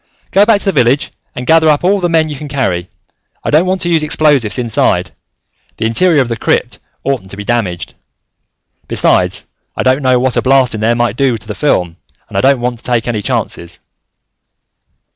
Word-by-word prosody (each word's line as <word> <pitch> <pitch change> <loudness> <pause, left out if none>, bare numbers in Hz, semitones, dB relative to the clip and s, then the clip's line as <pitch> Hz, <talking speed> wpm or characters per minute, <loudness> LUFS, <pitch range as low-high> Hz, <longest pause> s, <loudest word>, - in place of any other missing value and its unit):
"Go 200 +1 +4
back 225 -3 +5
to - - -8
the 195 - +2
village 125 -2 +1 0.2
and 125 - -5
gather 160 +1 +4
up 150 +1 +2
all 195 +3 +2
the 175 -2 0
men 160 -1 +2
you 150 - -5
can 150 +2 -8
carry. 95 -11 -2 0.5
I - - -2
don't 160 +5 +3
want 185 0 -1
to 175 - -1
use 165 -2 +2
explosives 145 -7 +2
inside. 120 -3 0 0.7
The 110 - -2
interior 150 +7 +3
of - - -7
the 115 - -2
crypt - - -1 0.2
oughtn't 130 -9 -2
to 100 - -8
be 105 - -6
damaged. 95 -7 -2 0.9
Besides, - - +1 0.3
I - - 0
don't 130 +2 +2
know 130 -1 +3
what 130 -1 0
a - - +3
blast 130 -2 +3
in 110 - -4
there 115 +2 +2
might 120 -2 -1
do 135 -4 +1
to 110 - -15
the 105 - -4
film, 90 - 0 0.3
and - - -12
I - - +2
don't 135 0 +3
want 120 -1 -2
to - - -13
take 120 -2 -1
any 110 -3 -1
chances." 85 -3 -3
130 Hz, 205 wpm, -13 LUFS, 115-155 Hz, 0.9 s, back